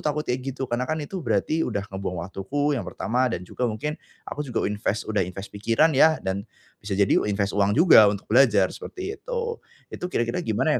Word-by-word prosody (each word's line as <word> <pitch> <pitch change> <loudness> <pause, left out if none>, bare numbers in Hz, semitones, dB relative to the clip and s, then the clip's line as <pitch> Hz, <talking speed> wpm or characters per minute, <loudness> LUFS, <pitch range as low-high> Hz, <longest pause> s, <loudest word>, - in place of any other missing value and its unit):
takut 150 +1 -1
kayak 125 +1 -1 0.2
gitu 135 - -2
karena 125 +1 -2
kan 155 - 0
itu 185 +4 -6
berarti 120 +6 0
sudah 100 -9 -1
membuang 90 -3 -4
waktuku 140 +11 -2
yang 135 - -1
pertama 125 +3 0
dan 90 -6 -4
juga 125 +6 -2
mungkin 145 +8 -3 0.3
aku 150 - -6
juga 125 -6 -2
invest, 105 +1 -1
sudah 105 -2 -1
invest 95 +2 -5
pikiran 115 +10 +2
ya 155 +4 +5
dan 95 +1 -1 0.4
bisa 100 -2 -3
jadi 100 -1 +3
u - - -2
invest 100 0 0
uang 100 +2 +2
juga 155 - +8
untuk 100 -1 -3
belajar 110 -5 +4
seperti 385 +3 -7
itu, - - -3 0.5
itu - - -6
kira-kira 120 -1 -1
gimana 135 +2 0
115 Hz, 200 wpm, -25 LUFS, 100-150 Hz, 0.5 s, juga